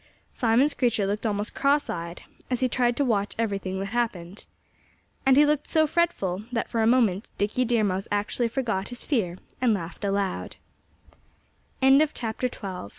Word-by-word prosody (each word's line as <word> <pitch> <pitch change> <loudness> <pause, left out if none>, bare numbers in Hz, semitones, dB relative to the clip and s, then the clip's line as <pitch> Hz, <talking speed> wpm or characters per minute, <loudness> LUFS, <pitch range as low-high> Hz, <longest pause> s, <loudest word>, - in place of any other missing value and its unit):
Simon 240 +4 +3
Screecher 240 -8 +1
looked 210 +3 -1
almost 205 0 -2
crosseyed, 175 - -1 0.3
as 250 -1 -1
he 255 - +3
tried 245 -1 +1
to 285 - +2
watch 205 -4 0
everything 195 -4 -2
that 195 +1 -3
happened. 200 -5 -3 0.8
And 265 0 +6
he 295 - +7
looked 295 0 0
so 315 -1 +3
fretful 300 - 0
that 230 -2 -1
for 230 - -1
a 220 - +3
moment 225 -5 +2
Dickie 215 +5 0
Deer 235 -2 +2
Mouse 195 -1 -1
actually 205 +4 0
forgot 230 -6 -2
his 245 -1 -6
fear 190 - -1 0.2
and 240 -4 +3
lau 195 +2 -2
225 Hz, 145 wpm, -26 LUFS, 195-250 Hz, 0.8 s, he